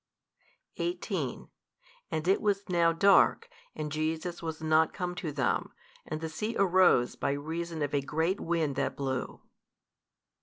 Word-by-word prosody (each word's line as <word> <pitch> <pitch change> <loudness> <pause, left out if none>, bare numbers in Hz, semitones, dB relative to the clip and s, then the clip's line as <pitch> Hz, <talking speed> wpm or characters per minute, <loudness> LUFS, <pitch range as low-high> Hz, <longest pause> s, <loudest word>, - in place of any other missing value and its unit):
18 345 +1 -3 0.6
And 155 +2 -3
it 190 - +3
was 200 -1 0
now 170 -2 +3
dark, 200 - +4 0.3
and 150 -1 -4
Jesus 160 +3 -2
was 160 -1 -4
not 160 0 +2
come 180 -1 -3
to 180 -3 -4
them, 140 -2 -1 0.3
and 155 0 -4
the 160 - -2
sea 210 +9 -4
arose 185 -10 +4
by - - -1
reason 160 +2 -4
of 145 - -3
a 140 - +2
great 160 +7 -1
wind 165 -4 -1
that 140 - -1
blew. 130 -2 -3
160 Hz, 145 wpm, -30 LUFS, 155-180 Hz, 0.6 s, dark